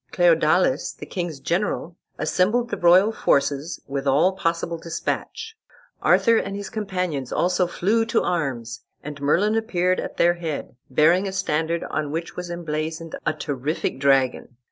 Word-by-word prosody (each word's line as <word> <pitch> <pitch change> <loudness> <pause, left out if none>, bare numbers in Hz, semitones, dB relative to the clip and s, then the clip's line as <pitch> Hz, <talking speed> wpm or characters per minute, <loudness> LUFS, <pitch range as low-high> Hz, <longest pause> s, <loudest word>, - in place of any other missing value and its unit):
Cleodalis, - - +3
the - - -10
king's 170 -6 -4
general, 170 +1 -2 0.2
assembled 235 +6 +1
the - - -1
royal 180 +5 +5
forces 145 -5 0
with 140 0 -4
all 145 +7 +4
possible 170 -2 -2
despatch. 170 - -4 0.5
Arthur 230 -1 +4
and 195 -2 -2
his 200 -1 -6
companions 180 - -3
also 180 0 +1
flew 210 +6 +1
to 230 +1 +1
arms, 120 -9 -2 0.2
and 145 0 -7
Merlin 180 +9 +2
appeared 185 -5 +1
at - - -6
their 175 0 +4
head, 165 -7 -5
bearing 165 +8 +3
a - - -3
standard 170 -3 -1
on 150 -2 -3
which 165 +2 -4
was 180 -1 -5
emblazoned 160 -1 -4
a 155 - +2
terrific 145 -1 -3
dragon. 135 -3 +1
170 Hz, 145 wpm, -23 LUFS, 150-190 Hz, 0.5 s, royal